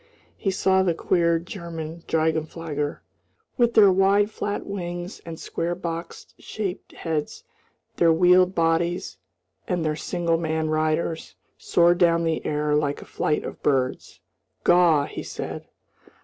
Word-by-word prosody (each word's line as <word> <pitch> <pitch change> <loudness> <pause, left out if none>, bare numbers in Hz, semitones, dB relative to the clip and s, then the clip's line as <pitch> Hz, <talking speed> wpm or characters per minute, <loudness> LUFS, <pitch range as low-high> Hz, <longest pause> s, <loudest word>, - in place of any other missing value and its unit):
He 195 - -2
saw 190 0 +2
the 175 -3 +1
queer 170 -1 +2
German 170 -2 -7
drachenflieger, 160 -2 -2 0.5
with 240 -2 +2
their 205 -3 +7
wide 200 +3 +3
flat 205 -1 -3
wings 175 -2 -5
and 165 -1 -7
square 170 +1 -3
box 170 -1 -6
shaped 200 -4 -5
heads, 155 -3 -4 0.5
their 165 -1 +5
wheeled 180 +2 +4
bodies, 170 - 0 0.5
and 175 -3 -1
their 155 -1 0
single 170 +1 -1
man 160 -1 -1
riders, 155 +1 -1 0.2
soar 175 0 +3
down 170 -1 +3
the 165 -1 -1
air 150 0 -1
like 145 -1 0
a - - -16
flight 150 - -1
of - - -8
birds. 130 -3 -1 0.4
"Gaw!" 170 -5 +5
he - - -7
said. - - -6
170 Hz, 135 wpm, -24 LUFS, 160-180 Hz, 0.5 s, their